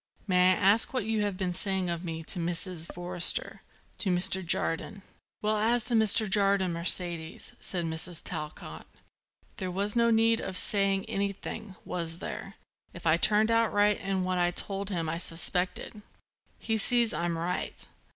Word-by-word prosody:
"May 185 -2 +4
I - - 0
ask 205 +8 +2
what 250 - -1
you 220 -1 0
have 205 -2 -2
been 185 -2 -2
saying 190 0 0
of 170 0 -3
me 165 -2 -5
to 175 - -5
Mrs. 170 0 -2
Forrester, 175 0 0 0.4
to 200 - -1
Mr. 185 +1 +3
Jardine?" 170 +3 -2 0.4
"Well, 215 0 +1
as 230 +2 +2
to 245 - +2
Mr. 220 0 +4
Jardine, 195 -3 +2
Mercedes," 170 -1 0
said 175 -3 -3
Mrs. 160 +1 -3
Talcott, 150 - -7 0.7
"there 185 - -4
was 200 +4 -2
no 235 0 +3
need 225 0 +3
of 190 -1 -5
saying 195 -1 +4
anything, 200 0 -4
was 165 -2 -2
there, 195 +2 -7 0.4
if 170 - -10
I 160 0 +4
turned 215 +5 +4
out 230 0 +2
right 205 0 +2
in 195 -1 -2
what 185 0 -1
I 175 0 +2
told 195 +2 -4
him 170 -5 -2
I 165 +2 -3
suspected. 180 +5 -1 0.6
He 225 -1 -2
sees 235 +1 +2
I'm 170 -1 -2
right. 175 +2 -3
190 Hz, 165 wpm, -28 LUFS, 175-210 Hz, 0.7 s, May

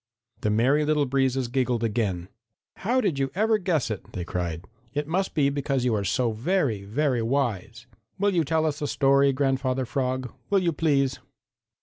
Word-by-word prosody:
The 105 - -1
Merry 130 +8 +3
Little 150 -1 +2
Breezes 135 -1 +1
giggled 125 -2 0
again. 105 -6 -1 0.5
"How 245 +6 +1
did 175 - 0
you 135 0 0
ever 220 +2 +2
guess 165 - 0
it?" 105 - -7
they 90 - -4
cried. 85 -1 -3 0.3
"It 145 0 -1
must 190 +4 -1
be 140 -3 +3
because 135 -2 -1
you 120 - +2
are 105 -2 0
so 115 +5 +1
very, 120 - 0
very 125 +4 0
wise. 115 -3 -2 0.3
Will 200 +1 +1
you 170 -2 +3
tell 160 +2 +1
us 150 -1 -2
a 145 - -1
story, 140 0 +3
Grandfather 130 -1 0
Frog? 130 0 -2 0.2
Will 200 - +3
you 170 -2 +1
please?" 140 -4 +1
135 Hz, 180 wpm, -26 LUFS, 115-150 Hz, 0.5 s, Merry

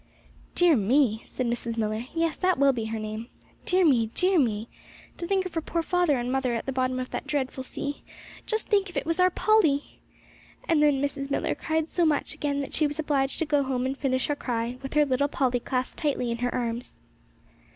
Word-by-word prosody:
'Dear 350 -3 +5
me!' 230 +1 +2
said 255 - -3
Mrs. 235 -1 -2
Millar. 215 +1 -1
'Yes, 330 -1 +1
that 370 -1 +1
will 275 0 +4
be 230 -3 -3
her 220 0 -3
name. 215 +1 -5 0.4
Dear 365 0 +3
me, 240 -7 +4
dear 365 -1 +3
me; 220 -4 0 0.5
to 345 - -3
think 385 0 +1
of 370 - -6
her 325 - -1
poor 335 +1 -2
father 355 -5 +2
and 245 +1 -2
mother 260 -2 0
at 230 - -3
the 270 - -2
bottom 255 -1 0
of 255 - -5
that - - -4
dreadful 265 -2 -2
sea! 285 +2 -5 0.5
Just 440 0 -1
think 400 -2 +2
if 350 - -7
it - - -1
was 330 +2 -1
our 365 0 +6
Polly!' 355 -8 +2 0.7
And 320 -3 +3
then 285 -2 +3
Mrs. 280 -1 -2
Millar 280 - 0
cried 320 -1 -1
so 345 - 0
much 305 -3 +1
again 285 -1 -2
that 275 - -6
she 305 - +3
was 290 +1 -5
obliged 280 -3 0
to 325 - 0
go 290 -1 +2
home 260 -2 -1
and 265 +1 -1
finish 260 -2 0
her 290 - 0
cry 240 -2 -3
with 270 +2 -7
her 300 0 +5
little 275 +1 +1
Polly 255 -3 0
clasped 255 +1 -3
tightly 270 -5 0
in 235 - -3
her 245 0 0
arms. 240 -1 -3
275 Hz, 220 wpm, -27 LUFS, 245-315 Hz, 0.7 s, our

